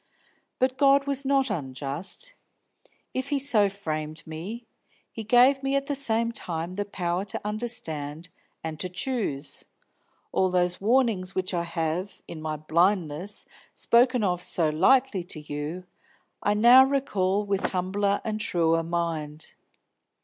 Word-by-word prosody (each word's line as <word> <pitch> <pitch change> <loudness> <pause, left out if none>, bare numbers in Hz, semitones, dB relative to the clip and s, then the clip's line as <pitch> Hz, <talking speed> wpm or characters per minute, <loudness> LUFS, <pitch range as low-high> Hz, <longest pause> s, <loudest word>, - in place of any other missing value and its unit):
But 255 0 0
God 275 -1 +5
was 280 -1 -2
not 270 -3 +2
unjust; 145 - -3 0.8
if 260 +2 -3
He 290 - +1
so 230 -7 +3
framed 155 -4 -5
me, 185 +10 -7 0.5
He 225 - -6
gave 250 +5 +5
me 270 0 0
at 275 0 0
the 285 - -2
same 230 -4 +1
time 170 -5 -4
the 205 +2 -3
power 180 -2 -2
to 205 - -4
understand 170 -8 -3 0.3
and 160 -1 -5
to 185 - -1
choose. 180 - -3 0.7
All 190 - +2
those 180 0 +1
warnings 215 -5 +2
which 185 0 -1
I 170 -1 -1
have, 170 +3 -3
in 160 - -8
my 155 0 -3
blindness, 170 +3 0 0.3
spoken 245 0 +3
of 180 -3 0
so 165 -3 +2
lightly 200 +4 +3
to 175 -3 -5
you, 150 +4 -5 0.6
I 205 - +1
now 240 +5 +8
recall 210 -8 0
with 200 -1 -1
humbler 200 +2 0
and 215 -1 -3
truer 165 -4 +3
mind. 165 -2 -3
190 Hz, 140 wpm, -26 LUFS, 165-240 Hz, 0.8 s, now